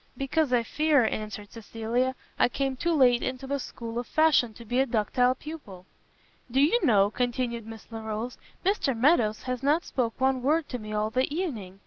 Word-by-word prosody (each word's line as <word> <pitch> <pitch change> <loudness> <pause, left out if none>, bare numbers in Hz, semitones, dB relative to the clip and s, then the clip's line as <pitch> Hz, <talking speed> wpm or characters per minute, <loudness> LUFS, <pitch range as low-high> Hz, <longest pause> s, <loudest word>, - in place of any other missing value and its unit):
"Because 275 +1 0
I 245 -2 +3
fear," 295 0 +2
answered 210 -1 -4
Cecilia, 230 +3 -2 0.2
"I - - +4
came 270 0 -1
too 340 +6 -1
late 255 -6 +4
into 255 +1 -4
the 280 +1 -2
school 235 -2 -6
of 245 - -5
fashion 310 -7 +3
to 235 - -11
be 245 +3 0
a 270 - +3
ductile 245 +3 +2
pupil." 260 - -10 0.6
"Do 260 +3 +1
you 345 - +3
know," 205 -8 +4
continued 240 -2 -2
Miss 225 -1 -10
Larolles, 225 +2 -5 0.3
"Mr 335 - +1
Meadows 230 -5 +3
has 255 -1 -3
not 300 +5 +2
spoke 235 -3 -2
one 265 -1 +2
word 300 +4 +1
to 250 - -4
me 215 -1 -8
all 215 0 -1
the 255 +4 0
evening! 230 - -4
250 Hz, 185 wpm, -27 LUFS, 225-275 Hz, 0.6 s, I